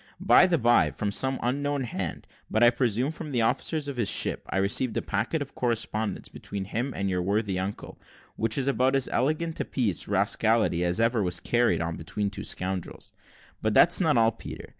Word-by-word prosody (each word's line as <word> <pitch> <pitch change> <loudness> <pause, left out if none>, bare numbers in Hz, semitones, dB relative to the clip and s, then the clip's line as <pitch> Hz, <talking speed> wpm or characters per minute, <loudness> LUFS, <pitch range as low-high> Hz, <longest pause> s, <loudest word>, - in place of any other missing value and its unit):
By - - +6
the 175 -2 +2
bye, 120 - +4
from 100 +8 -3
some 130 +5 0
unknown 140 +3 -1
hand, 120 - -4 0.2
but 110 - +2
I 120 - +7
presume 125 +2 0
from 155 -1 -8
the 120 -3 +1
officers 150 +6 0
of 140 -2 -5
his 115 -4 +1
ship, - - +1
I - - -2
received 105 +4 +1
a - - 0
packet 115 +9 -1
of 140 - -15
correspondence 110 -4 -2
between 100 -1 -7
him 120 +7 -3
and 100 - -2
your 90 -1 -1
worthy 100 0 -1
uncle, 95 +2 -6 0.4
which 110 -1 0
is 135 - 0
about 130 0 +2
as 135 -2 +1
elegant 155 +4 -1
a - - 0
piece 115 -9 -1
of - - -12
rascality 105 -2 +1
as 90 +3 +1
ever 115 0 +2
was 90 -2 -1
carried 120 -5 +1
on 85 -1 -4
between 100 +5 -3
two - - -7
scoundrels; 95 -1 -5 0.5
but 110 -1 0
that's 175 +2 +6
not 155 -7 +3
all, 115 0 +4
Peter. 115 - -10
115 Hz, 205 wpm, -26 LUFS, 100-130 Hz, 0.5 s, I